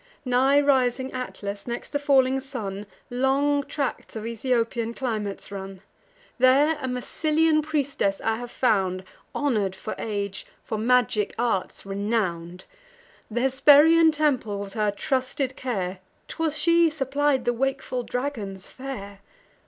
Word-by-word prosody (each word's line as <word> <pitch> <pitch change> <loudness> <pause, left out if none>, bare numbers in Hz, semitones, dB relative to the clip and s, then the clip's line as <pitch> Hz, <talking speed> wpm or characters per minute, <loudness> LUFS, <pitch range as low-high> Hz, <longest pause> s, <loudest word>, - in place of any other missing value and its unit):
Nigh 260 +3 +4
rising 260 -2 +2
Atlas, 205 -5 -6
next 240 0 -4
the 285 - -1
falling 270 -2 +3
sun, 210 -7 -6 0.2
Long 275 +3 +2
tracts 280 -4 -4
of 220 0 -5
Ethiopian 230 0 -1
climates 215 -7 -4
run: 195 -1 -7 0.6
There 275 +5 +5
a 260 - -2
Massylian 310 +5 +1
priestess 285 -10 -1
I 220 0 +1
have 245 +1 -7
found, 190 -7 +1 0.3
Honour'd 215 -10 0
for 215 - -5
age, 200 -3 -4 0.2
for 220 - -4
magic 225 -3 +2
arts 230 -7 -1
renown'd: 195 -4 -2 0.7
Th' 225 - -5
Hesperian 295 +5 +6
temple 280 -9 0
was 200 -1 -5
her 210 -1 +1
trusted 260 +5 -1
care; 190 -7 -3 0.3
'Twas 320 -2 -2
she 335 +2 +4
supplied 280 -2 0
the 240 - +2
wakeful 255 0 -2
dragon's 235 -7 -4
fare. 205 -7 -8
250 Hz, 125 wpm, -25 LUFS, 205-280 Hz, 0.7 s, Hesperian